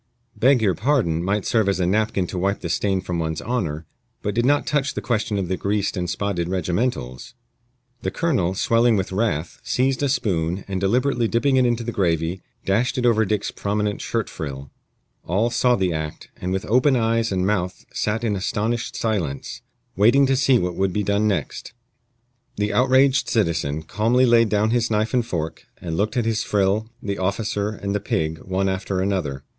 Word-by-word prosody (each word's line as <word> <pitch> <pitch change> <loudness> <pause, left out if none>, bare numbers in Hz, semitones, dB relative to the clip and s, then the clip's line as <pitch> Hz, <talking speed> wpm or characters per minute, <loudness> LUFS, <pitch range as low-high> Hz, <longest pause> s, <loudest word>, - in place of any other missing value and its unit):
"Beg 125 +2 +4
your 95 -3 +3
pardon" 110 - +1
might 100 +2 0
serve 110 -4 +2
as 95 - 0
a 90 - +2
napkin 105 0 +1
to 90 +1 -4
wipe 100 +2 0
the 85 - -4
stain 95 +3 0
from 90 -2 -3
one's 80 -1 -2
honor, 85 -11 -2 0.4
but 105 - -1
did 120 +3 +1
not 145 +1 +3
touch 145 -2 0
the - - -1
question 110 -3 -1
of 95 -2 -2
the 95 - -1
greased 100 +2 -1
and 90 -2 -2
spotted 90 -1 -2
regimentals. 90 - -2 0.7
The - - -1
colonel, 125 - 0
swelling 115 +3 +3
with 95 -2 -1
wrath, 95 -6 -1
seized 130 +1 0
a 140 - +1
spoon, 90 - -1
and 95 -2 -3
deliberately 120 +4 +1
dipping 130 +4 +2
it 130 -1 +4
into 120 -1 0
the 120 - -3
gravy, 85 -2 0 0.2
dashed 110 +7 +1
it 125 - 0
over 110 -2 +4
Dick's 105 0 -1
prominent 105 0 -2
shirt 115 -3 -2
frill. 70 -4 -7 0.6
All 105 +7 +1
saw 125 0 +3
the 95 -4 0
act, 80 -1 -5
and 90 - -4
with 95 +2 -2
open 130 +5 +3
eyes 115 -1 +1
and 95 -1 0
mouth 90 -3 -1
sat 110 +2 -1
in 110 -3 0
astonished 110 +5 -2
silence, 90 - -2 0.3
waiting 120 +8 +5
to 135 0 +2
see 135 -1 +4
what 90 -5 -1
would 95 +1 0
be 105 - 0
done 100 +2 +1
next. 95 -2 -3 0.8
The 105 0 -1
outraged 130 +3 +3
citizen 80 -7 0
calmly 115 +9 +2
laid 115 -2 +4
down 105 +1 +2
his 120 -1 +1
knife 110 +2 0
and 125 -2 +3
fork, 85 -8 -4
and 80 -2 -4
looked 105 +7 -1
at 120 - +1
his 110 -1 0
frill, 105 +1 +1
the 100 -1 -3
officer, 100 +2 -1
and 100 -2 -4
the 105 - 0
pig, 80 -5 -2
one 95 +1 -1
after 95 0 -2
another. 90 -9 -1
105 Hz, 190 wpm, -22 LUFS, 90-115 Hz, 0.8 s, waiting